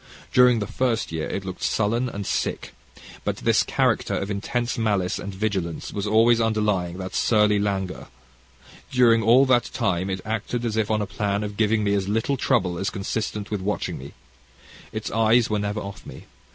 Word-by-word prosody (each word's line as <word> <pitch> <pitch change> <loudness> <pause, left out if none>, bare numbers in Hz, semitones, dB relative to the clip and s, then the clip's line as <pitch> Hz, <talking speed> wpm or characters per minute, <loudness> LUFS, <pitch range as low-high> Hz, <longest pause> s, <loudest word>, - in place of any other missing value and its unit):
During 125 -1 +6
the 105 - -1
first 115 0 -1
year 80 -1 -3
it 95 - -4
looked 95 -1 -6
sullen 115 +4 0
and 100 -3 -6
sick. - - -2 0.5
But - - -2
this - - +3
character - - +1
of 100 +1 -3
intense 120 +4 -2
malice 100 -5 0
and 100 - -5
vigilance 95 -4 -3
was 100 0 -3
always 115 +2 +4
underlying 105 -6 0
that 95 0 -6
surly 105 -2 +3
languor. 95 -2 -2 0.8
During 120 -3 +4
all 120 +5 +5
that 125 -2 +2
time 95 -6 -1
it 95 -1 -3
acted 115 +3 -2
as 110 -2 -1
if 110 -2 0
on 110 -1 +1
a - - -2
plan 100 +1 -2
of 105 -1 -5
giving 110 0 +2
me 100 -1 +1
as 100 -1 0
little 115 +6 0
trouble 90 -7 +1
as 95 - -2
was - - +2
consistent 105 +1 -4
with 105 -3 -2
watching 105 +2 -2
me. 70 +2 -10 0.8
Its - - -5
eyes 115 +1 +3
were 105 - +1
never 105 +1 -2
off 100 -1 -8
me. - - -11
105 Hz, 190 wpm, -24 LUFS, 100-115 Hz, 0.8 s, During